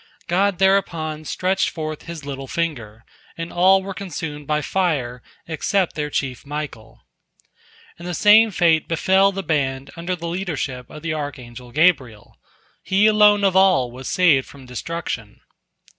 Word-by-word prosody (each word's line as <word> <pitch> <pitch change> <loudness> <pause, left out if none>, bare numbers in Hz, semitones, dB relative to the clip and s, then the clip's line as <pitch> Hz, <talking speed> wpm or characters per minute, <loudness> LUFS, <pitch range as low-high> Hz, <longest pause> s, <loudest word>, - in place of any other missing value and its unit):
God 190 +2 +1
thereupon 170 -5 +1
stretched 185 +4 0
forth 155 -2 -6
His 165 -4 -7
little 135 -1 -6
finger, 120 -10 -4 0.3
and 165 0 -6
all 190 +2 +4
were 195 0 -5
consumed 160 -6 -6
by 150 0 0
fire 135 -10 -1 0.3
except 175 +3 0
their 150 -1 -3
chief 135 -3 -3
Michael. 140 -7 -7 0.9
And 170 - -8
the 175 - -3
same 215 +5 +6
fate 170 -5 +2
befell 190 +4 +3
the 195 0 -5
band 140 -4 -1
under 170 +2 -3
the 170 -1 -6
leadership 160 -8 -4
of 150 - -11
the 165 -2 -2
archangel 125 -5 -7
Gabriel; 135 - +1 0.5
he 195 +2 +2
alone 210 -1 +5
of 190 -2 +2
all 185 -11 +4
was 130 +2 -7
saved 160 -8 +3
from 140 -2 -14
destruction. 125 -4 -5
160 Hz, 145 wpm, -21 LUFS, 135-185 Hz, 0.9 s, same